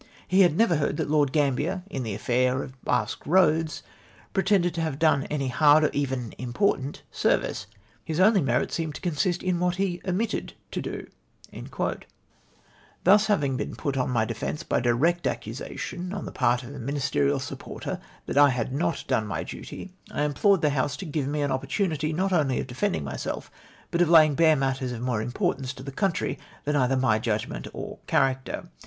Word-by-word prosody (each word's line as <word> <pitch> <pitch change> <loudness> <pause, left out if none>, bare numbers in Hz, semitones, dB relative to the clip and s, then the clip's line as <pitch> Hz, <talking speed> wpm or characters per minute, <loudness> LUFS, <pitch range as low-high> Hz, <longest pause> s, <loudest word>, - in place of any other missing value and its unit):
He 190 +2 +4
had 175 -4 +4
never 185 -8 +4
heard 145 - -1
that - - -2
Lord 145 -3 +3
Gambler, 150 +6 0
in 135 -10 -4
the 110 -5 -3
aflair 125 +4 +1
of 130 -1 -12
Basque 125 -3 -1
Eoads, 160 -2 +3 0.5
pretended 190 -2 +2
to 170 - -2
have 160 -4 -2
done 150 -3 +3
any 140 -3 -1
hard, 150 +4 +5
or 150 - +2
even 130 -5 -2
important 135 +2 -1
service. - - 0 0.4
His 160 +5 -3
only 195 +1 +5
merit 125 -2 +1
seemed 160 -3 -3
to - - -8
consist 175 +1 0
in 180 -2 0
what 180 0 +1
he 185 -2 -1
omitted 195 +5 -2 0.2
to - - -3
do." - - -5 0.5
Having - - -4 1.0
thus 205 +3 +6
been 140 -11 0
put 140 -2 -2
on 130 -1 0
my 115 -3 +2
defence 115 +8 -4
by - - 0
direct 140 +9 +2
accu - - -2
sation 180 +1 -6
on 195 - -4
the - - -6
part 125 0 +1
of 120 - -9
a 140 - -8
Ministerial 140 +2 0
supporter 130 - -6 0.3
that 140 - +1
I 145 0 +8
had 125 0 -2
not 160 +3 -1
done 110 - +1
my 95 - -3
duty, 195 - -8 0.2
I - - -1
implored 170 +5 +3
the 150 - +4
House 140 0 0
to 195 - -6
give 150 -3 -2
me 145 +1 -1
an 140 - 0
opportunity, 155 +3 -1
not 190 +4 0
only 145 -7 +2
of - - -2
defending 130 - -1
myself, 70 -1 -5 0.4
but 170 - +1
of 175 - +4
lapng 155 -3 +7
bare 160 0 +5
matters 130 -2 -1
of 115 - -6
more 125 -3 0
importance 130 - -1
to 130 - -10
the 140 - -6
country 190 +4 -1 0.2
than 150 +1 0
either 135 -1 +2
my 130 -5 +3
judgment 110 - -2
or - - -7
character. 135 0 0
145 Hz, 190 wpm, -26 LUFS, 130-170 Hz, 1.0 s, I